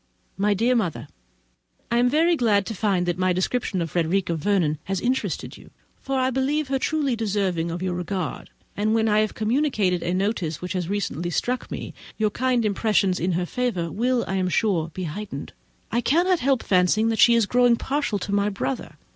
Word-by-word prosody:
My 205 Hz, +1 st, +1 dB
dear 235 Hz, +5 st, +2 dB
Mother,—I 145 Hz, -, -5 dB
am 245 Hz, +1 st, +4 dB
very 330 Hz, +5 st, +3 dB
glad 210 Hz, -, +2 dB
to 225 Hz, -, -4 dB
find 195 Hz, -3 st, 0 dB
that 175 Hz, 0 st, -2 dB
my 185 Hz, 0 st, +2 dB
description 185 Hz, 0 st, -1 dB
of 165 Hz, -, -6 dB
Frederica 175 Hz, +1 st, 0 dB
Vernon 165 Hz, -3 st, +1 dB
has 195 Hz, 0 st, -2 dB
interested 255 Hz, +5 st, -2 dB
you, -, -, -15 dB, 0.3 s
for 270 Hz, 0 st, -2 dB
I 260 Hz, 0 st, +2 dB
do 265 Hz, +1 st, 0 dB
believe 295 Hz, +1 st, 0 dB
her 270 Hz, -1 st, 0 dB
truly 290 Hz, -3 st, 0 dB
deserving 195 Hz, -6 st, -1 dB
of 170 Hz, +2 st, -4 dB
your 185 Hz, -1 st, -1 dB
regard; 180 Hz, -1 st, -4 dB, 0.3 s
and 215 Hz, +2 st, +1 dB
when 225 Hz, 0 st, +2 dB
I 210 Hz, 0 st, +3 dB
have 215 Hz, -1 st, 0 dB
communicated 220 Hz, -, +1 dB
a 175 Hz, -, -2 dB
notion 185 Hz, -3 st, -1 dB
which 180 Hz, +3 st, -5 dB
has 180 Hz, -2 st, -2 dB
recently 180 Hz, -4 st, -2 dB
struck 245 Hz, +8 st, -2 dB
me, -, -, -6 dB, 0.2 s
your 215 Hz, -1 st, +1 dB
kind 250 Hz, 0 st, +1 dB
impressions 200 Hz, -2 st, +1 dB
in 180 Hz, +2 st, 0 dB
her 175 Hz, +1 st, 0 dB
favour 185 Hz, -7 st, -2 dB
will, 245 Hz, +2 st, 0 dB
I 190 Hz, -, -1 dB
am 185 Hz, -1 st, 0 dB
sure, 180 Hz, -5 st, +1 dB
be 185 Hz, -, -5 dB
heightened. 170 Hz, -3 st, -6 dB, 0.4 s
I 235 Hz, +3 st, +1 dB
cannot 345 Hz, +8 st, +2 dB
help 265 Hz, -1 st, +1 dB
fancying 190 Hz, +4 st, +3 dB
that 225 Hz, -2 st, -1 dB
she 235 Hz, -, +7 dB
is 230 Hz, -2 st, +3 dB
growing 245 Hz, +2 st, +4 dB
partial 275 Hz, -3 st, -1 dB
to 200 Hz, +1 st, -4 dB
my 200 Hz, 0 st, +2 dB
brother. 210 Hz, +6 st, -4 dB
205 Hz, 195 wpm, -24 LUFS, 180-245 Hz, 0.4 s, she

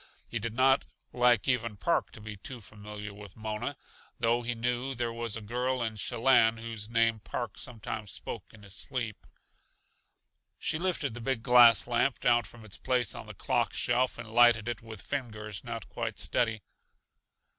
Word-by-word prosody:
He 115 Hz, -, -3 dB
did 115 Hz, +1 st, -4 dB
not 135 Hz, +2 st, +5 dB, 0.3 s
like 120 Hz, -4 st, +4 dB
even 115 Hz, -4 st, +1 dB
Park 95 Hz, -, +1 dB
to -, -, -8 dB
be 110 Hz, 0 st, -7 dB
too 120 Hz, +6 st, -7 dB
familiar 105 Hz, -1 st, -9 dB
with 100 Hz, -2 st, -12 dB
Mona, 110 Hz, +5 st, -4 dB, 0.4 s
though 120 Hz, 0 st, +2 dB
he 120 Hz, 0 st, -2 dB
knew 125 Hz, +3 st, -1 dB
there 120 Hz, -1 st, -1 dB
was 115 Hz, -2 st, -1 dB
a -, -, -7 dB
girl 125 Hz, +3 st, -1 dB
in 110 Hz, -1 st, -1 dB
Shellanne 115 Hz, +1 st, +4 dB
whose 115 Hz, -2 st, -5 dB
name 115 Hz, -1 st, +3 dB
Park 110 Hz, +1 st, -4 dB
sometimes 110 Hz, -3 st, -5 dB
spoke -, -, -5 dB
in 105 Hz, -, -16 dB
his 100 Hz, -2 st, -8 dB
sleep. 120 Hz, -3 st, -3 dB, 1.3 s
She 160 Hz, -, -1 dB
lifted 170 Hz, -8 st, 0 dB
the 120 Hz, -, -7 dB
big 115 Hz, -1 st, -1 dB
glass 120 Hz, -2 st, +8 dB
lamp 120 Hz, +2 st, +1 dB
down 120 Hz, -2 st, +3 dB
from 115 Hz, -2 st, -12 dB
its 100 Hz, -, -7 dB
place 125 Hz, -4 st, +1 dB
on -, -, -8 dB
the -, -, -9 dB
clock -, -, 0 dB
shelf 125 Hz, +1 st, +1 dB
and 115 Hz, -2 st, -8 dB
lighted 120 Hz, -2 st, +6 dB
it 120 Hz, -3 st, -3 dB
with 110 Hz, -3 st, -9 dB
fingers 110 Hz, -7 st, -4 dB
not 115 Hz, -2 st, -5 dB
quite 115 Hz, -3 st, -4 dB
steady. 115 Hz, -4 st, 0 dB
115 Hz, 175 wpm, -30 LUFS, 110-125 Hz, 1.3 s, glass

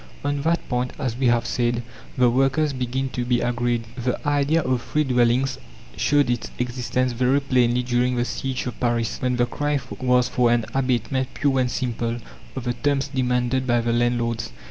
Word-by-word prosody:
On 145 Hz, 0 st, 0 dB
that 165 Hz, +3 st, 0 dB
point, 125 Hz, 0 st, -1 dB
as 130 Hz, -6 st, -2 dB
we 130 Hz, 0 st, +1 dB
have 120 Hz, -1 st, +3 dB
said, 120 Hz, -1 st, 0 dB, 0.3 s
the 125 Hz, -1 st, +5 dB
workers 135 Hz, +4 st, +2 dB
begin 130 Hz, +1 st, -2 dB
to 125 Hz, -1 st, -3 dB
be 120 Hz, 0 st, +1 dB
agreed. 120 Hz, -1 st, 0 dB
The 125 Hz, 0 st, -1 dB
idea 145 Hz, +3 st, +2 dB
of 130 Hz, -2 st, 0 dB
free 150 Hz, +5 st, 0 dB
dwellings 125 Hz, 0 st, +2 dB, 0.4 s
showed 145 Hz, -1 st, +2 dB
its 120 Hz, -1 st, -1 dB
existence 125 Hz, +1 st, -1 dB
very 130 Hz, +3 st, +2 dB
plainly 125 Hz, -3 st, +2 dB
during 125 Hz, +1 st, +1 dB
the 120 Hz, 0 st, 0 dB
siege 130 Hz, +2 st, -3 dB
of 125 Hz, -, -5 dB
Paris, 120 Hz, -2 st, 0 dB
when 125 Hz, -1 st, +1 dB
the 120 Hz, 0 st, +2 dB
cry 145 Hz, +3 st, -1 dB, 0.2 s
was 125 Hz, -1 st, +3 dB
for 125 Hz, -1 st, +2 dB
an 120 Hz, -2 st, +2 dB
abatement 130 Hz, 0 st, 0 dB
pure 135 Hz, -2 st, +1 dB
and 125 Hz, -1 st, +1 dB
simple 120 Hz, -2 st, -2 dB, 0.4 s
of -, -, -4 dB
the 120 Hz, 0 st, -1 dB
terms 140 Hz, +3 st, 0 dB
demanded 130 Hz, -1 st, 0 dB
by 120 Hz, -1 st, +3 dB
the 115 Hz, 0 st, 0 dB
landlords. 120 Hz, -, 0 dB
125 Hz, 185 wpm, -23 LUFS, 120-135 Hz, 0.4 s, the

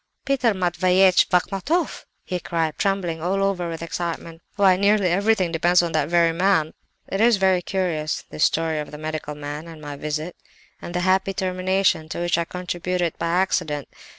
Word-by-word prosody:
"'Peter 255 Hz, -6 st, +1 dB
Matveyevitch 185 Hz, +1 st, +3 dB
Bachmatoff!' 195 Hz, -, 0 dB, 0.2 s
he 180 Hz, -, -3 dB
cried, 165 Hz, -2 st, -2 dB
trembling 185 Hz, -5 st, -1 dB
all 195 Hz, +3 st, 0 dB
over 185 Hz, -3 st, -1 dB
with 165 Hz, 0 st, -5 dB
excitement. 170 Hz, 0 st, -5 dB
'Why, 195 Hz, -2 st, +5 dB
nearly 200 Hz, 0 st, +3 dB
everything 195 Hz, -1 st, +2 dB
depends 175 Hz, +2 st, +3 dB
on 170 Hz, -, -2 dB
that 155 Hz, -2 st, 0 dB
very 170 Hz, -1 st, +4 dB
man!' 165 Hz, -3 st, +2 dB, 0.3 s
"It 195 Hz, -, -2 dB
is 230 Hz, -1 st, +5 dB
very 190 Hz, -2 st, +3 dB
curious, 170 Hz, -5 st, -2 dB
this 155 Hz, -, -1 dB
story 160 Hz, -1 st, +1 dB
of 150 Hz, -, -5 dB
the 150 Hz, -, -9 dB
medical 155 Hz, -1 st, -5 dB
man, 150 Hz, +2 st, -6 dB
and 165 Hz, -2 st, -10 dB
my 145 Hz, -1 st, -7 dB
visit, 155 Hz, +4 st, -4 dB, 0.5 s
and 175 Hz, -, -7 dB
the 180 Hz, -, 0 dB
happy 190 Hz, +1 st, +1 dB
termination 185 Hz, -3 st, 0 dB
to -, -, -5 dB
which 175 Hz, 0 st, +1 dB
I 170 Hz, -, 0 dB
contributed 180 Hz, -1 st, -3 dB
by 170 Hz, -, -1 dB
accident! 165 Hz, -5 st, 0 dB
175 Hz, 175 wpm, -23 LUFS, 160-190 Hz, 0.5 s, Why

